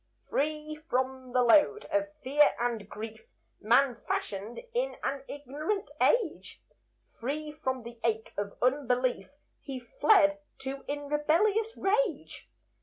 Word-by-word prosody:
Free 305 Hz, +1 st, -1 dB
from 260 Hz, 0 st, -1 dB
the 250 Hz, 0 st, +3 dB
load 310 Hz, -, +5 dB
of 300 Hz, 0 st, +2 dB, 0.2 s
fear 290 Hz, +3 st, +4 dB
and 230 Hz, -4 st, -2 dB
grief, 220 Hz, -, -8 dB, 0.3 s
Man 240 Hz, +2 st, +3 dB
fashioned 205 Hz, +4 st, -3 dB
in -, -, 0 dB
an 275 Hz, 0 st, -2 dB
ignorant 300 Hz, -, -3 dB
age; 450 Hz, -10 st, +1 dB, 0.6 s
Free 300 Hz, +5 st, -3 dB
from 260 Hz, -5 st, -3 dB
the 235 Hz, 0 st, -10 dB
ache 220 Hz, -1 st, -1 dB
of 200 Hz, 0 st, -4 dB
unbelief 250 Hz, -4 st, +1 dB, 0.3 s
He 270 Hz, -3 st, -6 dB
fled 300 Hz, -, +4 dB, 0.2 s
to 270 Hz, +1 st, -5 dB
in 290 Hz, 0 st, -4 dB
rebellious 390 Hz, +10 st, +2 dB
rage. 390 Hz, -, 0 dB
280 Hz, 120 wpm, -30 LUFS, 245-310 Hz, 0.6 s, load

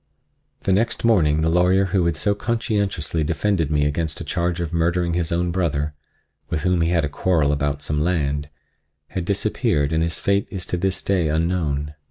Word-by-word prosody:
The 95 Hz, -, +1 dB
next 115 Hz, +4 st, 0 dB
morning 80 Hz, -10 st, +3 dB
the 80 Hz, -, +2 dB
lawyer 90 Hz, +3 st, +3 dB
who 90 Hz, -4 st, +3 dB
had 85 Hz, -, 0 dB
so 100 Hz, +6 st, +1 dB
conscientiously 100 Hz, -7 st, -1 dB
defended 85 Hz, 0 st, 0 dB
me 75 Hz, -1 st, +2 dB
against 75 Hz, +1 st, -1 dB
a -, -, -4 dB
charge 85 Hz, -1 st, -1 dB
of 85 Hz, -1 st, -3 dB
murdering 85 Hz, +1 st, +1 dB
his 85 Hz, -1 st, -1 dB
own 85 Hz, +1 st, 0 dB
brother—with 75 Hz, -3 st, -4 dB
whom 90 Hz, -1 st, +2 dB
he 80 Hz, -, +2 dB
had 85 Hz, -3 st, +2 dB
a -, -, 0 dB
quarrel 75 Hz, 0 st, +1 dB
about 70 Hz, 0 st, -1 dB
some 75 Hz, 0 st, -1 dB
land—had 75 Hz, 0 st, -4 dB
disappeared 75 Hz, -6 st, 0 dB
and 80 Hz, -, +2 dB
his 85 Hz, 0 st, -1 dB
fate 100 Hz, 0 st, +1 dB
is 95 Hz, -2 st, -5 dB
to 90 Hz, -, -2 dB
this 95 Hz, +2 st, -1 dB
day 95 Hz, -5 st, +1 dB
unknown. 75 Hz, -2 st, -1 dB
85 Hz, 180 wpm, -22 LUFS, 75-90 Hz, -, morning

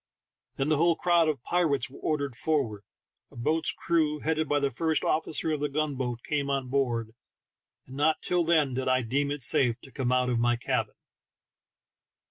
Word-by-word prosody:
Then 135 Hz, +2 st, -1 dB
the 155 Hz, -, +3 dB
whole 170 Hz, +2 st, +3 dB
crowd 170 Hz, -2 st, +3 dB
of 135 Hz, -6 st, -3 dB
pirates 145 Hz, -9 st, +1 dB
were 135 Hz, -, -14 dB
ordered 145 Hz, -5 st, -2 dB
forward, 130 Hz, -9 st, -1 dB, 0.5 s
a -, -, -19 dB
boat's 155 Hz, +7 st, +1 dB
crew, 155 Hz, -3 st, 0 dB
headed 160 Hz, -1 st, -1 dB
by 145 Hz, -, +2 dB
the 140 Hz, -1 st, 0 dB
first 160 Hz, +5 st, 0 dB
officer 160 Hz, 0 st, 0 dB
of 155 Hz, -, -1 dB
the 145 Hz, 0 st, -1 dB
gun 150 Hz, +1 st, -1 dB
boat, 125 Hz, -3 st, -4 dB
came 140 Hz, -2 st, -1 dB
on 135 Hz, -2 st, -1 dB
board, 120 Hz, -5 st, -1 dB, 0.7 s
and 130 Hz, +1 st, -11 dB
not 155 Hz, +2 st, +2 dB
till 180 Hz, -1 st, +1 dB
then 155 Hz, -5 st, +2 dB
did 130 Hz, +1 st, -2 dB
I 130 Hz, -1 st, +2 dB
deem 140 Hz, +5 st, 0 dB
it 145 Hz, -2 st, -3 dB
safe 120 Hz, 0 st, +3 dB
to 135 Hz, -, -14 dB
come 125 Hz, -2 st, -2 dB
out 125 Hz, 0 st, +2 dB
of 120 Hz, -, 0 dB
my 120 Hz, 0 st, +2 dB
cabin. 120 Hz, -, -2 dB
140 Hz, 190 wpm, -28 LUFS, 125-155 Hz, 0.7 s, the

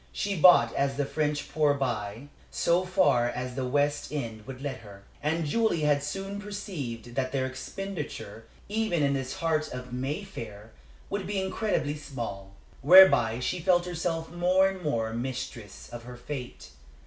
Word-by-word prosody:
She 200 Hz, -1 st, -2 dB
bought 160 Hz, -9 st, +7 dB
as 135 Hz, 0 st, 0 dB
the 145 Hz, -, +1 dB
French 150 Hz, 0 st, -1 dB
poor 145 Hz, -1 st, +3 dB
buy, 120 Hz, -1 st, -3 dB, 0.2 s
so 170 Hz, +2 st, +2 dB
far 180 Hz, -10 st, +3 dB
as 125 Hz, +1 st, -4 dB
the 130 Hz, 0 st, -2 dB
West 145 Hz, +2 st, 0 dB
End 115 Hz, -7 st, -5 dB
would 130 Hz, -1 st, -7 dB
let 135 Hz, -1 st, -4 dB
her, 100 Hz, -2 st, -13 dB, 0.2 s
and 160 Hz, +2 st, 0 dB
Julie 220 Hz, +1 st, +1 dB
had 145 Hz, -1 st, +3 dB
soon 195 Hz, +7 st, -4 dB
perceived 155 Hz, -, -6 dB
that 130 Hz, 0 st, -1 dB
their 130 Hz, -1 st, 0 dB
expenditure, 140 Hz, -, -6 dB, 0.2 s
even 210 Hz, -7 st, 0 dB
in 140 Hz, 0 st, +2 dB
this 135 Hz, -1 st, -3 dB
heart 155 Hz, -2 st, 0 dB
of 125 Hz, 0 st, -7 dB
Mayfair, 125 Hz, -, -5 dB, 0.4 s
would 200 Hz, -2 st, -2 dB
be 200 Hz, -1 st, -1 dB
incredibly 190 Hz, -5 st, -1 dB
small. 115 Hz, -10 st, -7 dB, 0.3 s
Whereby 140 Hz, -8 st, +7 dB
she 180 Hz, +8 st, -1 dB
felt 175 Hz, 0 st, +3 dB
herself 165 Hz, -2 st, -3 dB
more 180 Hz, +2 st, +3 dB
and 190 Hz, -1 st, -7 dB
more 115 Hz, -8 st, -1 dB
mistress 120 Hz, -3 st, -5 dB
of 120 Hz, -1 st, -9 dB
her 125 Hz, 0 st, -9 dB
fate. 125 Hz, -, -7 dB
145 Hz, 160 wpm, -28 LUFS, 125-180 Hz, 0.4 s, bought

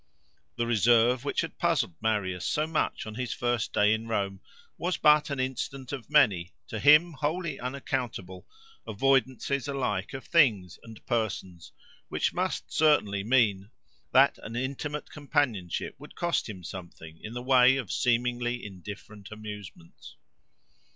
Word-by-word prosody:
The 120 Hz, -, -1 dB
reserve 120 Hz, +2 st, +3 dB
which -, -, 0 dB
had -, -, -7 dB
puzzled 85 Hz, -, +1 dB
Marius 100 Hz, -5 st, -1 dB
so 150 Hz, +9 st, 0 dB
much 160 Hz, 0 st, -1 dB
on 110 Hz, -, -7 dB
his 125 Hz, +1 st, -3 dB
first 120 Hz, -2 st, -1 dB
day 105 Hz, +1 st, +4 dB
in 110 Hz, +1 st, -3 dB
Rome, 100 Hz, -3 st, -2 dB, 0.3 s
was 180 Hz, +1 st, -2 dB
but 150 Hz, -1 st, +5 dB
an 140 Hz, -2 st, -3 dB
instance 130 Hz, 0 st, -3 dB
of 135 Hz, -4 st, -6 dB
many, 105 Hz, -, +3 dB
to 110 Hz, -, -4 dB
him 150 Hz, +7 st, +6 dB
wholly 155 Hz, +1 st, -2 dB
unaccountable, 125 Hz, -8 st, -4 dB, 0.4 s
avoidances 135 Hz, +3 st, +1 dB
alike 125 Hz, -6 st, -2 dB
of 135 Hz, -, -6 dB
things 110 Hz, -, +3 dB
and 115 Hz, -2 st, -13 dB
persons, 95 Hz, -7 st, -3 dB, 0.4 s
which -, -, 0 dB
must -, -, -3 dB
certainly 105 Hz, -11 st, +3 dB
mean 105 Hz, -4 st, +2 dB, 0.4 s
that -, -, +5 dB
an 115 Hz, -, -8 dB
intimate 140 Hz, +4 st, -4 dB
companionship 140 Hz, -, -1 dB
would -, -, -13 dB
cost 170 Hz, -8 st, -1 dB
him 95 Hz, -4 st, -8 dB
something 85 Hz, -3 st, -9 dB
in 110 Hz, -, -7 dB
the 120 Hz, -, -4 dB
way 130 Hz, 0 st, +6 dB
of 125 Hz, -8 st, -4 dB
seemingly 120 Hz, 0 st, 0 dB
indifferent 100 Hz, +1 st, -10 dB
amusements. 105 Hz, -6 st, -10 dB
120 Hz, 140 wpm, -28 LUFS, 105-135 Hz, 0.4 s, him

